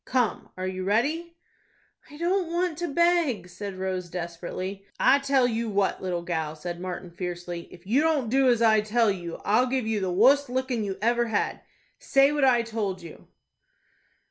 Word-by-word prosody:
Come, 250 -4 0
are 185 - -3
you 185 0 -3
ready?" 300 - 0 0.7
"I 295 - -12
don't 350 +1 0
want 345 -2 -1
to 350 - -1
beg," 325 - +2
said 200 +1 -7
Rose, 185 -1 -3
desperately. 180 +3 -5 0.2
"I 280 - +5
tell 275 -2 +2
you 230 -1 -2
what, 200 -1 0
little 175 -2 -2
gal," 160 -3 -2
said 175 +2 -6
Martin, 180 0 -6
fiercely; 175 -1 -5
"if 175 0 -14
you 240 +9 +3
don't 310 -6 +1
do 265 +3 +3
as 235 -1 +3
I 220 -1 +5
tell 220 0 +2
you, 175 -3 -6
I'll 230 +5 +3
give 255 -2 -1
you 220 -1 0
the 190 -2 -1
wust 260 +9 +4
lickin' 255 -2 -1
you 195 -2 -3
ever 235 +1 +2
had. 220 -2 -1 0.4
Say 275 +1 +4
what 295 -1 0
I 245 -3 +4
told 210 -5 -3
you." 165 - -12
220 Hz, 180 wpm, -26 LUFS, 185-270 Hz, 0.7 s, I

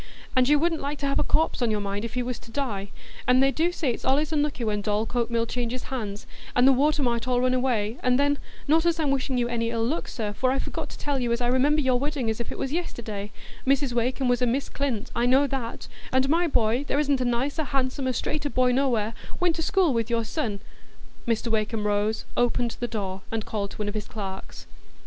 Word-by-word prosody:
And 255 +1 +4
you 295 - +6
wouldn't 325 +1 +1
like 285 +1 -3
to - - 0
have 275 - +1
a - - +3
corpse 320 -4 +1
on 240 - +2
your 215 -1 +1
mind, 200 +1 -3
if 230 +1 -5
he 250 - 0
was 245 0 -3
to - - -15
die; 225 -7 -3 0.4
and 250 +1 +5
they 270 - +4
do 330 +5 +1
say 325 -5 -1
as - - +2
it's - - -8
allays 290 +4 +2
unlucky 290 -4 0
when 210 -2 0
Dorlcote 220 +3 0
Mill 230 -1 +1
changes 245 +1 -3
hands, 210 -5 -4 0.3
and 250 +1 +6
the - - +8
water 290 +2 +2
might 235 -1 0
all 250 -1 +2
run 255 0 +2
away, 245 -3 0
and 250 0 +3
then—not 285 +2 +1
as 335 -1 +2
I'm 295 -3 +2
wishing 265 -1 0
you 240 -1 +1
any 230 -1 -1
ill 230 -1 0
luck, 300 +8 -1
sir, 210 -3 -3
for 255 +4 +1
I 265 - +1
forgot - - -4
to - - -9
tell 285 -2 -1
you 240 -2 0
as 235 - +1
I 245 - 0
remember 270 +5 +3
your 255 -3 +2
wedding 280 -5 -1
as 220 - -4
if 235 - -4
it - - -6
was 270 +1 -2
yesterday; 220 - -4 0.4
Mrs 275 -1 +2
Wakem 250 +2 0
was 245 0 +2
a 250 - +3
Miss 265 +4 0
Clint, 260 -7 -2
I 235 +1 +2
know 265 +3 +5
that; 260 -4 -4 0.2
and 260 +1 +3
my 335 +4 +3
boy, 235 -5 +2
as 285 - -5
there 285 - +1
isn't 285 -3 +2
a - - +3
nicer, 260 +6 0
handsomer, 260 -1 0
straighter 290 +4 -2
boy 255 -2 +3
nowhere, 245 -5 +1 0.3
went 350 -2 +2
to - - -1
school 360 -3 +3
with 230 0 0
your 230 -1 +1
son——" 220 -5 -3 0.7
Mr 230 0 0
Wakem 215 0 0
rose, 210 +1 0
opened 240 -1 +1
the 240 - -1
door, 195 -4 -4
and 225 -1 -2
called 200 -2 -3
to - - -11
one 210 - -2
of 205 - -2
his 215 -2 -4
clerks. 195 -3 -7
250 Hz, 245 wpm, -26 LUFS, 225-275 Hz, 0.7 s, the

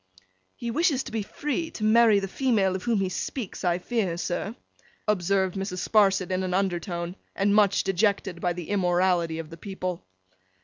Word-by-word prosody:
'He 235 -1 -4
wishes 300 -1 +2
to - - -8
be 220 -1 -1
free, 295 +9 -3
to 215 - -7
marry 220 -1 +5
the 195 - -3
female 200 -5 +1
of 190 - -3
whom 235 -2 +2
he 190 - 0
speaks, 215 +3 -4
I 175 -1 +2
fear, 190 -3 -1
sir,' 195 +5 -3 0.5
observed 190 -2 +1
Mrs. 190 -2 -3
Sparsit 195 -4 +3
in 185 0 0
an 185 -1 -1
undertone, 175 -2 -2 0.2
and 200 +1 +2
much 205 -2 +4
dejected 195 -2 0
by 175 -1 +1
the 175 -2 -7
immorality 180 -3 +2
of 165 -1 -7
the 165 - -9
people. 185 -2 -5
195 Hz, 175 wpm, -26 LUFS, 180-215 Hz, 0.5 s, marry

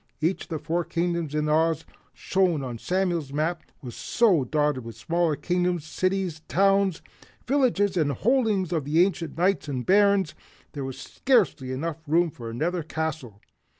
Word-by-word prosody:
Each 165 +5 0
of - - -31
the 160 - -2
four 165 +3 -1
Kingdoms 170 -3 -2
in 150 0 0
Oz 160 +1 +2 0.3
shown 180 -6 0
on 120 -3 -5
Samuel's 175 -5 -1
map 155 +4 -1 0.2
was 120 -3 -7
so 200 - +2
dotted 145 -1 0
with 115 -1 -9
smaller 165 +6 0
Kingdoms, 175 -1 -1
cities, 185 -1 -1
towns, 195 -1 +2 0.4
villages 235 -8 +2
and 155 -5 +2
the 140 - -2
holdings 215 - +1
of 155 -4 -1
ancient 170 +2 +1
Knights 180 -3 +1
and 130 -4 -3
Barons, 200 -3 +4 0.4
there 140 - -5
was 135 -1 -5
scarcely 155 - +1 0.4
room 165 +2 +2
for 115 -4 -8
another 165 +10 -1
castle. 155 -9 -4
165 Hz, 150 wpm, -26 LUFS, 150-185 Hz, 0.4 s, Barons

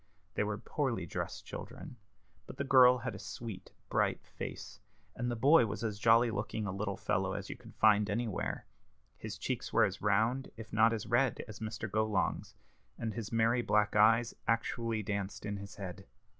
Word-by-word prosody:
They - - +1
were 105 0 -2
poorly 120 - -2
dressed 80 - -5
children, 125 - -8 0.5
but - - -9
the 140 - -1
girl 130 -2 +7
had 125 0 -4
a - - -8
sweet, 115 -5 -7 0.2
bright - - 0
face, 100 +1 -7 0.4
and 120 0 -2
the 120 - -1
boy 135 +2 +5
was 105 +1 -5
as 105 -2 -2
jolly 115 +1 +5
looking 105 +1 -3
a 100 - -2
little 100 0 -3
fellow 95 0 0
as 100 -1 -5
you - - -5
could - - -15
find 105 -1 +4
anywhere. 110 -1 -2 0.5
His - - -6
cheeks - - -3
were - - +5
as - - -4
round, 110 +6 +1
if 110 -1 -10
not 110 +1 +5
as 110 -2 -2
red, 125 +1 +1
as 110 -1 -9
Mr. 110 0 -4
Golong's, 105 -1 -1 0.4
and 110 -2 -3
his 115 -3 -5
merry 115 +1 +3
black 105 -3 +2
eyes 115 +2 +5
actually 115 0 0
danced 100 0 -3
in 105 -1 -3
his 100 +1 -9
head. 95 0 -7
110 Hz, 185 wpm, -33 LUFS, 100-115 Hz, 0.5 s, girl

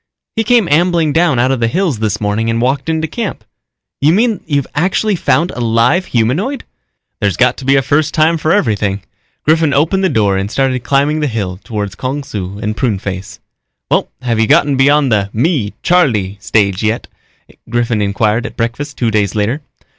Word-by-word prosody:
"He 225 - +1
came 235 -4 +3
ambling 165 0 +2
down 165 -4 +2
out 125 +2 +2
of 135 - 0
the 115 - +1
hills 170 - -1
this 105 -1 -1
morning 105 +2 -1
and 115 0 0
walked 135 +5 0
into 160 0 0
camp." 220 +5 -5 0.6
"You 145 +3 +4
mean 220 +2 +1
you've 140 -3 0
actually 190 +6 +1
found 170 0 +1
a - - -8
live 115 +10 +2
humanoid?" 145 - 0 0.6
"There's - - 0
got - - +3
to 135 - -8
be 135 +1 +4
a 135 - +3
first 155 +3 +1
time 160 +1 +2
for 155 +1 0
everything." 105 - 0 0.4
Griffin 160 -1 +3
opened 165 +7 +2
the 190 - +3
door 105 - +1
and 95 +1 -2
started 130 0 0
climbing 140 +4 +1
the 150 - 0
hill 100 -7 -3
toward 105 -4 -4
Kung 135 +3 -3
Su 100 -6 -6
and 105 0 -3
Pruneface. 100 -5 -3 0.5
"Well, - - +1
have 115 -3 0
you 110 - +3
gotten 145 -2 +3
beyond 140 0 +3
the 100 -2 +1
'me, 120 - 0
Charlie' 110 - +1
stage 100 -4 +1
yet?" 110 +2 -1 0.6
Griffin 120 -2 0
inquired 105 +3 0
at - - -12
breakfast 130 +6 -3
two 115 -2 0
days 105 -2 0
later. 110 +8 -1
130 Hz, 185 wpm, -15 LUFS, 110-155 Hz, 0.6 s, You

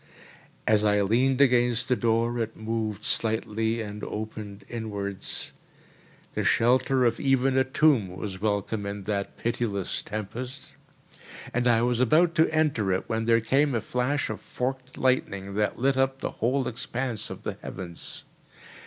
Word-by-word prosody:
As 105 -1 +4
I 105 -1 +3
leaned 130 +6 +2
against 120 -2 +4
the 125 - +3
door, 115 +2 +1
it 115 -1 -3
moved 110 -1 -3
slightly 110 0 0
and 105 0 -7
opened 105 -2 -6
inwards. 100 -4 -4 0.8
The - - -1
shelter 125 +2 +3
of 115 -1 +1
even 135 -1 +2
a 130 - +5
tomb 130 -5 +3
was 95 -3 -5
welcome 105 0 -1
in 100 0 -5
that 100 0 -3
pitiless 115 -5 -2
tempest, 125 +6 -6 0.8
and 125 +1 +1
I 115 -1 +4
was 120 -1 +1
about 160 +7 +4
to 160 -1 +4
enter 150 -11 +1
it 95 - -1
when 110 -1 -1
there 115 0 +4
came 135 +4 +2
a - - +2
flash 125 +6 -1
of 110 - -6
forked 130 +1 -4
lightning 100 -7 0
that 105 +1 0
lit 135 +1 +2
up 135 0 +2
the - - -3
whole 130 +4 0
expanse 120 -1 -3
of - - -8
the - - -4
heavens. 85 -3 -7
115 Hz, 155 wpm, -27 LUFS, 105-130 Hz, 0.8 s, a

